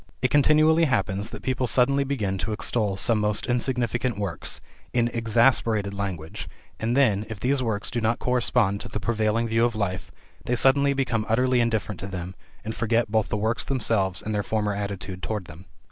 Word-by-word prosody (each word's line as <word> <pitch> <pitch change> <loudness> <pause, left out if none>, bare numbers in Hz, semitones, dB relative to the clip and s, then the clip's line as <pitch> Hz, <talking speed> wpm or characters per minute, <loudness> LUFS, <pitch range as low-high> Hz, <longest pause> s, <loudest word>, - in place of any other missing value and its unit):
It 130 - +2
continually 155 +3 +4
happens 105 -7 0
that - - -9
people 130 0 0
suddenly 135 +4 +3
begin 105 -9 -2
to 110 - -2
extol 105 -2 -1
some 110 +3 +2
most 105 0 0
insignificant 120 -1 -1
works, 100 -4 -1 0.3
in 120 -1 +2
exaggerated 115 -3 +2
language, 95 -6 -5 0.3
and 115 +3 0
then, 110 -7 +3
if 110 -2 -6
these 130 +4 +1
works 110 -4 -2
do 120 - -2
not 110 +1 +1
correspond 120 -5 +1
to - - -7
the 105 - -4
prevailing 110 +1 0
view 115 +1 +2
of 120 -1 +1
life, 95 -4 -3 0.4
they 125 - +1
suddenly 140 +3 +4
become 120 -5 -1
utterly 125 +2 +2
indifferent 110 -4 -1
to 95 - -5
them, 90 -1 -6 0.3
and 110 - -3
forget 115 -1 0
both 110 -2 +1
the - - -1
works 110 +3 0
themselves 105 -8 0
and 110 - -3
their 105 - 0
former 105 0 -1
attitude 100 -2 -5
toward 105 -2 -3
them. 80 +4 -12
110 Hz, 185 wpm, -25 LUFS, 100-125 Hz, 0.4 s, continually